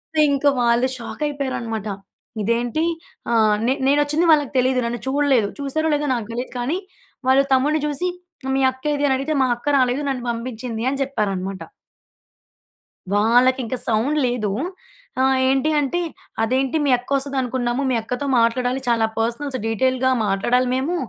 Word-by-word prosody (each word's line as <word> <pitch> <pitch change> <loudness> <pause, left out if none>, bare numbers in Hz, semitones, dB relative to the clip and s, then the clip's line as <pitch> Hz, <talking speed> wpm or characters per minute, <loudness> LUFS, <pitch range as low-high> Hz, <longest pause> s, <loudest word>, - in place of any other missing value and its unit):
అయితే, 310 - +4
ఇంకా 280 +1 +3
వాళ్ళు 240 +2 +3
షాక్ 235 +4 -8
అయిపోయారన్నమాట. 235 -7 -3 0.6
ఇదేంటి 235 +7 0 0.5
ఆహ్, 220 -2 +4
నే 260 - +3
నేను 285 +1 +4
వచ్చింది 300 +4 +1
వాళ్ళకి 295 -3 +1
తెలియదు. 255 0 +2
నన్ను 240 0 -3
చూడలేదు. 265 -6 +2
చూసారో, 300 +3 -1
లేదో 295 0 -1
నాకు 230 -4 -4
తెలియదు 245 +2 -5
కానీ 270 +9 -1 0.5
వాళ్లు 270 +1 +5
తమ్ముడిని 290 +4 +2
చూసి 300 +5 -1 0.4
ఆహ్, 265 - 0
"మీ - - +1
అక్కేది" 285 +2 -2
అని 265 - +2
అడిగితే, 285 +4 -2
"మా - - +2
అక్క 240 - -15
రాలేదు. 255 +2 +1
నన్ను 255 -3 -3
పంపించింది" 230 -1 -5
అని 275 0 -3
చెప్పారన్నమాట. 195 -7 -3 1.5
వాళ్ళకింక 245 +4 +3
సౌండ్ 235 +7 +1
లేదూ. 240 -5 -1 0.7
ఆహ్, 265 0 +3
ఏంటీ 270 +3 +2
అంటే, 295 +5 0 0.4
"అదేంటి 260 +5 +1
మీ 280 - +3
అక్క 245 - -13
వస్తదనుకున్నాము 260 -2 -1
మీ - - +2
అక్కతో 250 +5 -4
మాట్లాడాలి. 245 +3 +1
చాలా 230 -2 +3
పర్సనల్స్ 250 +4 -1
డీటెయిల్‌గా 260 +3 +1 0.2
మాట్లాడాలి 240 +6 +1
మేము." 275 +7 -1
255 Hz, 150 wpm, -21 LUFS, 235-275 Hz, 1.5 s, వాళ్లు